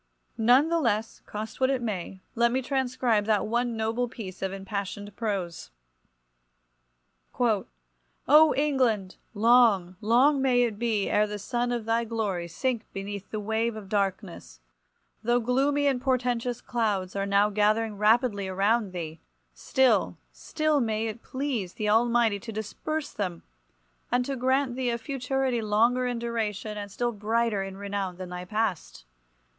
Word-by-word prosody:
None 250 +7 +5
the 335 0 +2
less, 225 -5 -1
cost 215 +4 -6
what 260 - +4
it 270 -2 +1
may, 195 -5 -4
let 235 0 +2
me 260 +1 0
transcribe 250 -5 0
that 215 -2 +2
one 235 +1 -1
noble 225 +2 -1
piece 190 -6 -8
of 190 -1 -1
impassioned 200 +1 -5
prose— 195 -7 -3 1.7
"O 220 -5 +2 0.9
England! 250 -10 +1 0.2
long, 210 -5 +4
long 260 +6 +4
may 250 -2 +3
it 220 -4 -2
be 225 -4 0
ere 210 0 +2
the 210 0 -5
sun 240 +4 -2
of 240 -2 -2
thy 230 +1 +1
glory 210 -6 -2
sink 235 +6 -3
beneath 200 0 -6
the 215 - -4
wave 220 +2 -1
of 205 -3 -9
darkness! 190 - -3 0.6
Though 240 +2 +2
gloomy 275 +4 +1
and 265 -3 +1
portentous 245 -2 0
clouds 205 -6 -1
are 200 0 -1
now 200 +1 +3
gathering 215 +1 +1
rapidly 210 -2 +3
around 200 +2 +1
thee, 165 -2 -6 0.3
still, 260 - +2
still 310 -2 0
may 220 -1 -1
it 225 +1 -5
please 260 -9 -3
the 210 -1 -2
Almighty 230 -1 +3
to 230 +2 -8
disperse 250 +8 -4
them, 180 -5 -4 0.7
and 245 +1 +2
to 275 - -2
grant 260 0 +1
thee 255 -1 -1
a 235 - 0
futurity 265 -1 -1
longer 230 +4 +2
in 245 -1 -2
duration 220 -3 -3
and 205 -1 -6
still 240 +4 -1
brighter 220 0 0
in 195 0 -6
renown 200 -2 -4
than 185 -1 -7
thy 180 0 -6
past! 200 - -3
225 Hz, 150 wpm, -27 LUFS, 200-245 Hz, 1.7 s, None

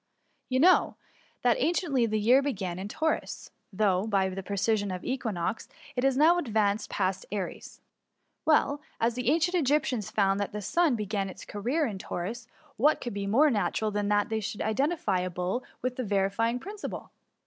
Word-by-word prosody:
You 255 0 +1
know, 360 +6 +5 0.5
that - - +3
apciently 295 - +1
the 215 - 0
year 240 +6 +5
began 190 -10 -3
in 195 - -4
Taurus, 315 +8 -2 0.2
though, 195 0 +1
by 195 -3 +2
the 190 +1 -5
precession 200 +1 0
of 180 -1 -5
the - - -2
equinox, 220 -6 -3 0.3
it 250 - -1
has 270 -1 +2
now 330 +4 +5
advanced 215 -7 0
past 190 -1 -1
Aries. 200 -3 -5 0.6
Well, 295 -2 +3 0.2
as 230 +1 +2
the 250 +1 -1
ancient 330 +4 +2
Egyptians 275 - +1
found 195 -1 +2
that 205 - -3
the 210 - -3
sun - - -8
St46 - - -6
THE 345 -1 +4
MUMICY. 245 - 0
began 200 -1 -2
its 190 - -10
career 250 +10 -1
in 210 -6 -4
Taurus, 220 +7 -5 0.3
what 295 +7 +3
could 240 - -5
be 200 0 -3
more 280 +9 +4
natural 215 0 0
than 205 0 -1
that 205 +2 +2
they 220 0 0
should 210 0 -4
identify 220 - 0
a 180 0 -2
bull 180 +8 -2 0.2
with 255 0 -2
the 255 - -1
vivifying 205 +3 +1
principle 410 +7 -7
220 Hz, 190 wpm, -28 LUFS, 200-270 Hz, 0.6 s, know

